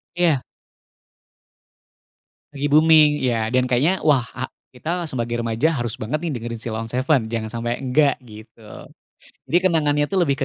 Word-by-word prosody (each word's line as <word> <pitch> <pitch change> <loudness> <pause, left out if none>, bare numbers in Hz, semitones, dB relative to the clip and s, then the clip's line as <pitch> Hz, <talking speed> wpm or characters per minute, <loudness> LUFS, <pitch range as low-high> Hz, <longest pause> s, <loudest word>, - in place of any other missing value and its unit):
Iya. 165 -7 +2 2.1
Lagi 145 0 -2
booming, 150 -1 +5
iya. 115 -3 0
Dan 125 0 +3
kayaknya, 150 +10 +1
"Wah, 140 -6 +3
a 130 - -3 0.3
kita 170 +7 -3
sebagai 120 -5 -3
remaja 115 +7 +1
harus 120 -2 -3
banget, 115 +8 -1
nih, 170 0 -3
dengerin 115 -1 -5
Sheila 110 -1 -4
on 115 - -7
7, 130 -1 +1
jangan 110 -1 -3
sampai 120 +1 -3
enggak." 135 +1 +2
Gitu. 110 -2 -14 0.8
Jadi 170 - +3
kenangannya, 150 -5 +1
tuh, 190 -2 +1
lebih 140 -4 0
130 Hz, 150 wpm, -21 LUFS, 115-155 Hz, 2.1 s, booming